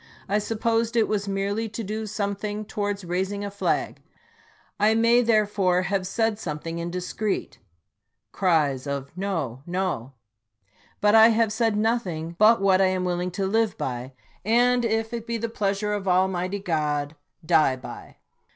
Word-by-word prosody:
I 205 +2 +1
supposed 225 +2 -1
it 225 -2 +3
was 205 -1 -1
merely 200 +3 -1
to 225 +2 -5
do 215 +2 -4
something 205 0 -3
towards 205 -2 -3
raising 190 +4 -2
a 200 - -5
flag 200 - -1 0.4
— 445 - -30 0.3
I 215 +2 +4
may, 230 +2 +4
therefore, 205 -5 +2
have 190 0 -1
said 225 +2 0
something 165 -1 -5
indiscreet. 180 +4 -3 0.7
[Cries 150 -8 +1
of 140 -1 -4
" - - -33
No, 140 -10 -3
No." 175 -9 -2 0.4
] 95 -1 -35
But 210 +1 +4
I 225 0 +9
have 225 -1 +2
said 220 -1 +1
noth 225 0 +1
ing 165 0 -5
but 220 +2 +6
what 195 -1 +4
I 190 - +5
am 185 -1 -1
willing 180 0 -1
to 190 +2 -3
live 220 +1 +1
by, 125 +1 -4 0.3
and, 245 +3 +3
if 225 0 -1
it 230 -1 -5
be 235 0 -1
the 230 +1 -3
pleasure 210 -1 -1
of 200 -2 -3
Almighty 185 +1 +1
God, 150 -5 -1 0.3
die 155 -5 +4
by. 130 - -10
200 Hz, 165 wpm, -25 LUFS, 175-220 Hz, 0.7 s, I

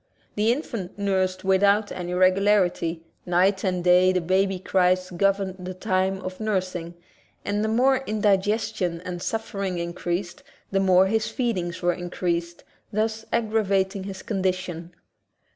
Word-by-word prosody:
The 215 +2 +2
infant 230 - -4
nursed 190 -2 0
without 200 +2 +3
any 180 0 -4
regularity; 185 -3 +2 0.2
night 190 +2 +2
and 180 -3 -1
day 180 +1 +5
the 185 - +1
baby's 190 +2 0
cries 185 0 +2
governed 195 +1 0
the 185 0 -6
time 190 +1 0
of 185 0 -6
nursing 185 -5 -2 0.5
and 205 +1 0
the - - +1
more 255 +4 +3
indigestion 205 -3 0
and 180 -1 -6
suffering 200 -4 -3
in 170 0 -3
creased 175 +7 -3 0.3
the 195 - +2
more 190 -1 +5
his 215 +2 0
feedings 185 -9 -2
were 175 0 +3
increased, 175 -1 -3 0.3
thus 220 +1 -1
aggravating 200 -3 0
his 195 -1 -7
condition. 185 -4 -2
190 Hz, 135 wpm, -24 LUFS, 180-205 Hz, 0.5 s, day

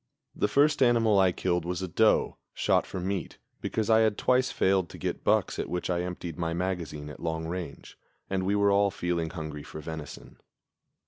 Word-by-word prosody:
The - - +1
first 150 +1 +3
animal 115 -5 +4
I 95 -1 +5
killed 90 -1 -1
was 90 +1 -3
a - - -2
doe, 85 - +2 0.2
shot - - +2
for 95 - -5
meat, 95 0 -3 0.2
because 110 -2 -1
I 110 -1 +5
had 110 -2 +2
twice 130 0 +2
failed 95 -2 +2
to - - -10
get - - -4
bucks - - +1
at - - -3
which 90 +1 -2
I 85 -1 0
emptied 90 -2 -5
my 85 -1 -1
magazine 85 -5 -3
at - - -11
long 80 0 -3
range, 85 -3 -7 0.3
and 95 -1 -1
we 100 +2 +1
were 100 0 +3
all 100 0 +4
feeling 90 -4 -2
hungry 80 -4 -6
for 75 - -9
venison. 80 -1 -8
90 Hz, 195 wpm, -28 LUFS, 85-100 Hz, 0.3 s, I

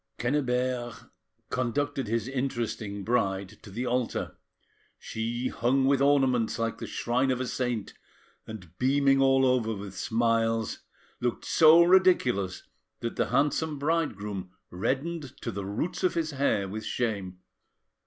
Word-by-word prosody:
Quennebert 125 -2 -1 0.4
conducted 135 +1 -1
his 115 +1 -1
interesting 120 -6 -3
bride 100 -4 -1
to - - -12
the 115 +6 -4
altar, 125 -1 -2 0.6
she 120 +3 -3
hung 130 +3 +1
with 135 0 +3
ornaments 135 -5 +3
like 115 0 -2
the - - -5
shrine 125 +3 0
of 130 -1 0
a 130 - -1
saint, 125 -4 -2 0.5
and, 90 -6 -10
beaming 135 +1 +3
all 135 0 +4
over 120 -4 +1
with 100 -1 -8
smiles, 115 +2 0 0.4
looked 120 -1 -2
so 160 +1 +7
ridiculous 170 - +3 0.4
that 115 - -3
the - - 0
handsome 150 +1 +1
bridegroom 105 - -2 0.2
reddened 140 - -3
to - - -4
the 100 0 -5
roots 155 - -3
of 185 - +2
his 165 -1 -1
hair 135 -8 +1
with 110 +3 -5
shame. 100 -7 -2
125 Hz, 135 wpm, -28 LUFS, 110-135 Hz, 0.6 s, so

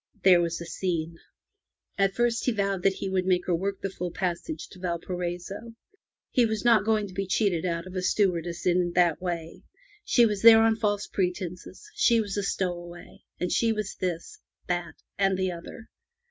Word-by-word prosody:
There 180 -2 +7
was 170 0 -2
a 170 - -6
scene. 170 -2 -3 0.8
At 195 0 +1
first 240 -1 +1
he 250 - +3
vowed 200 -3 -1
that 195 +1 +3
he 195 - -4
would 190 -1 -1
make 180 -1 +2
her 180 - 0
work 195 +3 -1
the 195 - -3
full 180 -1 -4
passage 180 - -3
to 185 - -14
Valparaiso. 180 +4 -4 0.6
He 250 - +4
was 220 0 -1
not 230 -3 +5
going 215 -2 +1
to 185 - -12
be 195 +1 -3
cheated 185 -3 +1
out 170 0 -2
of 185 - -10
a 185 - -1
stewardess 175 -3 0
in 175 -1 +2
that 175 -2 +3
way. 170 -3 -4 0.4
She 240 -10 +4
was 210 -3 -1
there 225 -1 +9
on 225 0 +4
false 205 -2 0
pretenses; 180 - -4
she 245 - +3
was 205 -3 -2
a 205 - 0
stowaway; 175 -3 -4 0.3
she 230 +4 +2
was 215 -2 -4
this, 180 - -4 0.3
that, 175 -2 -3 0.2
and 195 -1 +2
the 185 -1 0
other. 175 +6 -9
185 Hz, 185 wpm, -27 LUFS, 175-210 Hz, 0.8 s, there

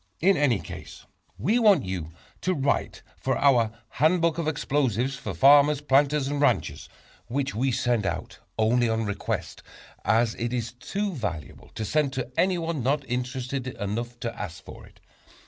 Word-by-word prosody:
In 195 +4 +4
any 145 -8 +3
case 80 - -10 0.3
we 205 - +2
want 205 - +5
you 90 -4 -4 0.3
to 185 0 0
write 140 -1 -1
for - - -1
our 120 -6 +4 0.2
"Handbook 165 +3 +2
of 165 - -1
Explosives 135 -4 0
for 125 +1 -6
Farmers, 145 +1 +6
Planters 145 0 +2
and 145 0 -2
Ranchers," 145 - +1 0.4
which 135 +3 -2
we 130 +5 0
send 120 -4 +1
out - - -4 0.2
only 115 +2 +3
on 110 0 0
request, 100 -1 -3 0.4
as 110 +2 +2
it 120 +1 -2
is 120 -2 -2
too 195 +11 -3
valuable 85 - -5
to 110 - -3
send 145 +4 +1
to 130 -2 -4
anyone 170 -5 0
not 140 +3 0
interested 125 +1 -3
enough 120 +1 -4
to 115 - -3
ask 95 -5 -7
for - - -11
it. - - -22
130 Hz, 160 wpm, -26 LUFS, 115-145 Hz, 0.4 s, Farmers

